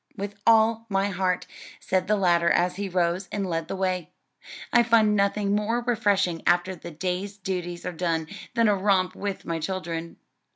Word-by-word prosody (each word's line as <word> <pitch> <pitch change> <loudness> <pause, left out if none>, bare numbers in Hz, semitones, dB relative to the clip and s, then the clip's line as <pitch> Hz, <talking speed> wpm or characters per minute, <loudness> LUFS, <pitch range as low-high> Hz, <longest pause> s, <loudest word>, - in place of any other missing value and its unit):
"With 200 0 -4
all 225 0 +4
my 195 0 +1
heart," 185 -1 -1 0.3
said 185 -1 0
the 210 - +3
latter 175 -3 +3
as 180 +2 +2
he 200 -1 -3
rose 175 +1 0
and 200 -2 -2
led 165 -2 -2
the - - -4
way, 185 -4 -1 0.6
"I 240 - +7
find 225 -3 +4
nothing 200 0 +1
more 210 +3 +1
refreshing 205 -8 +1
after 180 +2 +2
the 170 0 -9
day's 185 +5 -3
duties 180 -2 -4
are 180 - -2
done, 165 -2 -1 0.3
than 230 -2 +4
a 205 - +4
romp 190 -2 +2
with 200 -1 -5
my 165 -1 -2
children." 170 -1 -4
190 Hz, 175 wpm, -25 LUFS, 175-205 Hz, 0.6 s, I